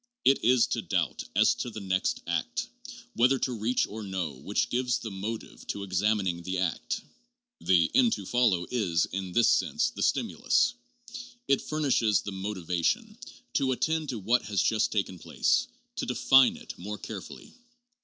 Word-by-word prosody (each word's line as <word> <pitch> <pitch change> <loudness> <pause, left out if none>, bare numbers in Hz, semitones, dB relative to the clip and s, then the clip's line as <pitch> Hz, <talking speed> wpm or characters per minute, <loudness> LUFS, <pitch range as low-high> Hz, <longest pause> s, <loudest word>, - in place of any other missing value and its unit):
It 135 - +4
is 125 0 +5
to - - -1
doubt - - -1
as - - +5
to - - -4
the 110 - -7
next 95 -1 -1
act, - - -2 0.5
whether 125 +3 +4
to 130 0 -1
reach 115 +2 0
or 110 +2 -8
no, 95 -7 -3
which 70 +11 -2
gives 125 -1 +1
the 110 - -7
motive 105 +4 -6
to 100 - -3
exami 100 +3 +1
ning 85 -2 -2
the 95 +2 -3
act. 90 -3 -2 0.6
The 85 -3 +3
end 250 -3 +5
to - - -4
follow 110 -8 +2
is, 95 -9 +1
in 95 -1 -5
this 120 - +4
sense, - - +2
the - - -7
stimulus. 250 -1 +2 0.7
It 135 - +3
furnishes 130 - +1
the 100 - -6
motivation 95 - -2 0.4
to 130 -1 +2
attend 160 +3 -1
to 125 - -3
what 115 +4 +2
has 100 -2 0
just 110 0 +1
taken 95 -4 -2
place; - - +1 0.3
to - - -2
define 135 -1 +5
it - - -9
more 105 +4 -5
carefully. 105 -3 -9
105 Hz, 165 wpm, -28 LUFS, 95-125 Hz, 0.7 s, is